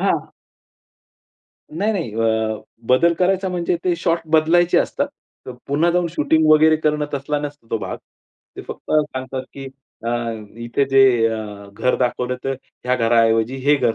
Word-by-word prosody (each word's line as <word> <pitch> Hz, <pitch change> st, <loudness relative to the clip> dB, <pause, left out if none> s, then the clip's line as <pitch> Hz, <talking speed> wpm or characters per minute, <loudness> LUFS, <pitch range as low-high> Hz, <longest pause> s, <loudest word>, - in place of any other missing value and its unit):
हां. -, -, 0 dB, 1.5 s
नाही 205 Hz, +5 st, +1 dB
नाही. 165 Hz, -, -3 dB
अ, 110 Hz, -1 st, 0 dB, 0.3 s
बदल 170 Hz, +7 st, +4 dB
करायचा 190 Hz, +2 st, +1 dB
म्हणजे 175 Hz, -1 st, -1 dB
ते 180 Hz, -, +2 dB
शॉट 170 Hz, 0 st, +1 dB, 0.2 s
बदलायचे 170 Hz, +3 st, +4 dB
असतात. 285 Hz, 0 st, -1 dB, 0.4 s
तर 130 Hz, -, -6 dB
पुन्हा 155 Hz, +5 st, +2 dB
जाऊन 175 Hz, 0 st, +1 dB
शूटिंग 160 Hz, 0 st, +2 dB
वगैरे 155 Hz, +1 st, +6 dB
करणं 150 Hz, -1 st, 0 dB
तसला 140 Hz, +2 st, -2 dB
नसतो 145 Hz, -4 st, -7 dB
तो 115 Hz, -, 0 dB
भाग. -, -, -5 dB, 0.6 s
ते -, -, -7 dB
फक्त -, -, -9 dB
सांगतात 130 Hz, -4 st, -1 dB
की 135 Hz, -1 st, -8 dB, 0.4 s
अ, -, -, 0 dB, 0.6 s
इथे 120 Hz, +4 st, 0 dB
जे 135 Hz, -, +5 dB, 0.3 s
अ, 105 Hz, -2 st, -5 dB
घर 125 Hz, +5 st, 0 dB
दाखवलं 125 Hz, 0 st, -1 dB
तर 135 Hz, -, 0 dB, 0.3 s
ह्या 125 Hz, -, +2 dB
घराऐवजी 115 Hz, +1 st, +2 dB
हे 145 Hz, +1 st, +5 dB
घर 120 Hz, -4 st, +1 dB
140 Hz, 155 wpm, -20 LUFS, 120-165 Hz, 1.5 s, वगैरे